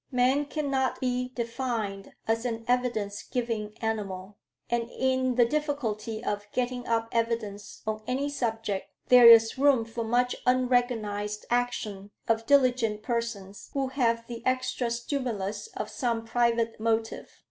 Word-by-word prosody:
Man 260 +3 +3
cannot 275 -3 -1
be 250 -1 0
defined 230 -5 -3
as 225 +1 +1
an 230 -2 -3
evidence 235 -5 0
giving 225 -3 -3
animal; 200 -3 -3 0.3
and 235 0 -1
in 260 -1 0
the 240 -1 +5
difficulty 235 -6 -2
of 205 -2 -3
getting 250 0 -2
up 230 0 +1
evidence 230 -3 -2
on 215 0 -2
any 270 +3 0
subject, 225 -7 -2 0.2
there 250 -1 +9
is 225 +2 +7
room 275 -5 +4
for 230 +1 -4
much 245 +2 +1
unrecognized 245 -5 +1
action 220 -5 -1 0.2
of 225 0 +1
diligent 250 -6 +3
persons 225 -5 -4
who 270 -2 0
have 230 -4 +1
the 235 0 -8
extra 255 -1 0
stimulus 235 - -3
of - - -3
some 235 -3 -2
private 230 -1 +1
motive. 225 0 -1
235 Hz, 135 wpm, -28 LUFS, 220-250 Hz, 0.3 s, there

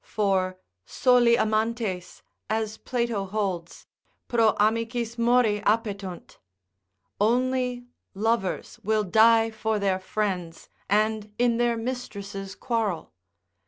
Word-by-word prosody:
For 190 -3 0 0.3
soli 245 - +4
amantes, 215 -4 -1 0.3
as 220 0 -2
Plato 235 -5 -2
holds, 190 -4 -3 0.4
pro 230 -2 +3
amicis 230 +2 0
mori 235 -3 +3
appetunt, 205 -5 -2 0.8
only 250 +2 +1 0.3
lovers 215 -2 -1
will 215 +1 +1
die 225 +3 +5
for 220 0 -1
their 195 -2 0
friends, 185 -4 -3 0.2
and 215 +1 +1
in 240 -1 +2
their 240 -1 +1
mistress' 200 -5 -5
quarrel. 225 -8 -2
220 Hz, 95 wpm, -26 LUFS, 200-235 Hz, 0.8 s, die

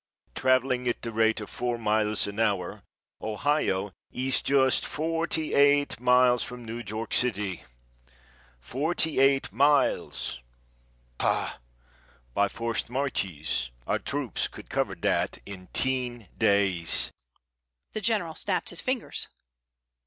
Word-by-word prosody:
Travelling 130 - +2
at 120 - -1
the 115 - -3
rate 110 0 +2
of 105 - -7
four 120 -1 -2
miles 110 -1 +1
an 100 +1 -5
hour, 100 -5 0 0.4
Ohio 105 -4 0 0.2
is 130 +1 +1
just 130 -2 +3
forty 160 0 -2
eight 145 -1 +4
miles 125 0 +5
from 125 -1 -6
New 115 +2 -5
York 110 +2 -4
city! 105 -6 0 1.0
Forty 150 - -1
eight 135 0 +4
miles! 140 - +2 0.8
Pah! - - 0 0.8
By 100 - +3
forced 115 +1 -2
marches 95 - -1 0.2
our - - 0
troops - - -2
could - - -12
cover - - 0
that - - 0
in 95 -2 -9
ten 125 -5 -1
days." 95 -5 +2 0.8
The 215 - -3
General 200 -6 +1
snapped 185 +3 0
his 175 - +1
fingers. 255 -2 -1
125 Hz, 115 wpm, -27 LUFS, 105-140 Hz, 1.0 s, miles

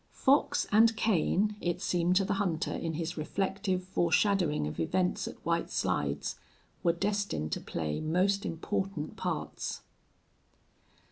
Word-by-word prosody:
Fox 275 +3 +3
and 225 +1 +5
Kane, 210 0 +2
it 175 -1 -1
seemed 175 0 +1
to 195 +1 +4
the - - 0
hunter 170 -5 -1
in 165 -1 -3
his 165 +2 -3
reflective 190 +3 -1
foreshadowing 180 - +2
of 75 - -5
events 180 - 0
at - - -6
White - - 0
Slides, 70 0 -1 0.4
were 170 - +4
destined 200 - -1
to - - -2
play 75 -2 -3
most 185 +5 +1
important 190 -1 -3
parts. - - -3
180 Hz, 130 wpm, -30 LUFS, 160-200 Hz, 0.4 s, and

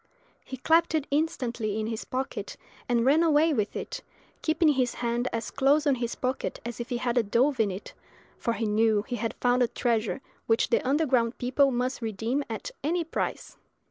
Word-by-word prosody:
He 260 - -7
clapped 325 +4 +3
it 305 -3 0
instantly 240 -8 -1
in 215 - -1
his 225 0 -4
pocket, 260 +1 -4 0.3
and 235 -1 +2
ran 290 +5 +5
away 320 -1 +4
with 210 -6 -1
it, - - -5 0.4
keeping 315 0 +3
his 260 -4 +1
hand 240 +1 -1
as 230 0 -3
close 285 +3 +3
on 285 - +4
his 240 -2 -2
pocket 255 +1 -2
as 240 -1 -5
if 240 - -5
he 245 - -1
had 240 0 +1
a - - +5
dove 245 +5 +1
in 215 -2 +3
it, 190 +1 -7 0.5
for 235 - 0
he 230 - -2
knew 215 0 +2
he 245 +1 -4
had 230 -1 -3
found 245 0 +2
a 245 - +4
treasure 230 0 0 0.3
which 225 0 +2
the - - +3
underground 255 -4 +1
people 265 +3 +3
must 250 0 -1
redeem 225 +5 -1
at - - -5
any 335 +4 +1
price. 325 - -4
245 Hz, 195 wpm, -27 LUFS, 230-285 Hz, 0.5 s, ran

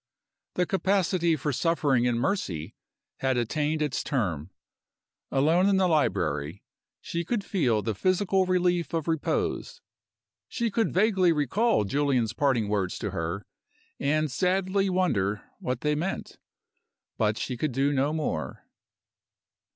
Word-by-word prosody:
The 180 - +2
capacity 185 -3 +1
for 145 0 -2
suffering 140 -5 +2
in 120 -1 +1
Mercy 110 - -2 0.4
had 130 -1 0
attained 150 +6 0
its 145 -4 -2
term. 90 - -2 0.8
Alone 160 +8 +3
in 195 - +3
the 190 -1 +3
library, 90 - 0 0.4
she 170 0 -3
could 205 +4 -2
feel 125 - +1
the 110 - -1
physical 185 - +1
relief 180 -2 +1
of 160 -1 -2
repose; 160 -2 -1 0.7
she 235 -2 -2
could 225 -3 +1
vaguely 190 -2 +3
recall 165 - +2
Julian's 125 0 +1
parting 125 -5 +1
words 100 -3 -1
to - - -4
her, 85 +4 -3 0.5
and 155 +1 +1
sadly 190 +5 +1
wonder 105 - 0 0.2
what 125 -1 -3
they 150 0 +1
meant 170 +6 -4 1.0
she 125 - -3
could 145 +4 -1
do 135 +3 +1
no 140 +2 +1
more. 115 - -3
150 Hz, 130 wpm, -27 LUFS, 120-185 Hz, 1.0 s, Alone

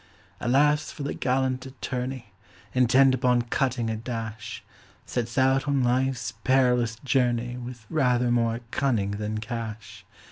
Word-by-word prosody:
Alas! 145 +4 +3
for 145 - -7
the 140 - -2
gallant 130 0 0
attorney, 130 -3 -5 0.4
Intent 130 +1 +5
upon 125 -2 +2
cutting 120 0 0
a 110 - -1
dash, 115 0 -6 0.4
Sets 120 +1 -3
out 135 +1 +3
on 140 -2 +2
life's 130 0 0
perilous 125 -3 +3
journey 125 -3 +1
With 120 -2 -8
rather 125 -4 +2
more 115 -1 +1
cunning 115 -8 +1
than 105 +1 -3
cash. 110 -3 -6
125 Hz, 130 wpm, -26 LUFS, 115-130 Hz, 0.4 s, Intent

